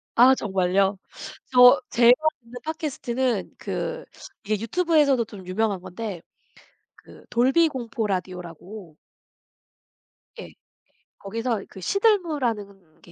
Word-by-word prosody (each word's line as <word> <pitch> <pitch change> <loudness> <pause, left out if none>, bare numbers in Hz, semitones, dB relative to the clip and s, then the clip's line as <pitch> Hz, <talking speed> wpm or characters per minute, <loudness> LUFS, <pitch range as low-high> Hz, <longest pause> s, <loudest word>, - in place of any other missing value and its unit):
아 255 +3 +7
정말요? 195 -2 0 0.5
저 250 +2 +8
제가 240 0 +6 0.3
듣는 235 +1 -20
팟캐스트는 260 - -2
그 485 0 -4 0.4
이게 215 0 -1
유튜브에서도 290 -1 +2
좀 205 -4 -12
유명한 200 +1 -1
건데 185 0 -7 0.8
그 - - -17
돌비 265 +8 +3
공포 240 -4 -4
라디오라고 180 -1 -6 1.4
예. - - -10 0.7
거기서 225 +1 -3
그 190 - -12
시들무라는 245 - -1
게 175 - -17
230 Hz, 230 characters per minute, -24 LUFS, 195-265 Hz, 1.4 s, 저